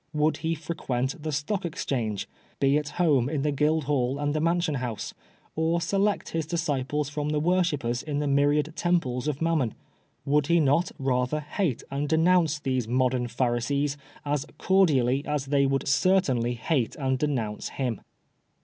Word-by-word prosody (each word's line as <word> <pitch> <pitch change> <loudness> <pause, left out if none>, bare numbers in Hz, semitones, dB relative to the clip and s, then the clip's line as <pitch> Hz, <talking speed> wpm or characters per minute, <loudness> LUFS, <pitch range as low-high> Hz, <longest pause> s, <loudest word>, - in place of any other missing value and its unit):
Would 150 +1 +2
he 165 +1 -1
frequent 150 -3 -3
the 155 0 -3
Stock 155 +7 -2
Exchange, 120 - -2 0.3
be 140 0 +3
at 150 -1 0
home 145 -8 +3
in 145 -2 -1
the 150 - +1
Guild 150 +2 +1
hall 135 -2 0
and 145 0 -1
the 155 - 0
Mansion 170 -1 +1
House, 115 -4 -4 0.4
or 160 +2 +1
select 200 +4 0
his 165 -2 -2
disciples 150 -4 -1
from 145 +1 -3
the 150 0 +1
worshippers 150 -8 +1
in 150 -2 -3
the 145 - 0
myriad 145 +2 +2
temples 150 -7 0
of 150 +1 -1
Mam 165 -1 +2
mon? 120 -5 -1 0.5
Would 145 0 +2
he 170 +1 +4
not 155 +3 +2
rather 130 +2 0
hate 150 - -2
and 140 +1 -2
denounce 160 -1 +3
these 130 -5 -1
modern 125 0 +1
Pharisees 130 +4 0 0.3
as 145 -1 -1
cordially 140 -9 +3
as 150 -2 -1
they 140 0 +2
would 135 0 -1
certainly 135 -7 +2
hate 125 0 -1
and 130 -3 -1
denounce 120 -8 -2
him. 125 -5 -3
145 Hz, 165 wpm, -27 LUFS, 130-160 Hz, 0.5 s, he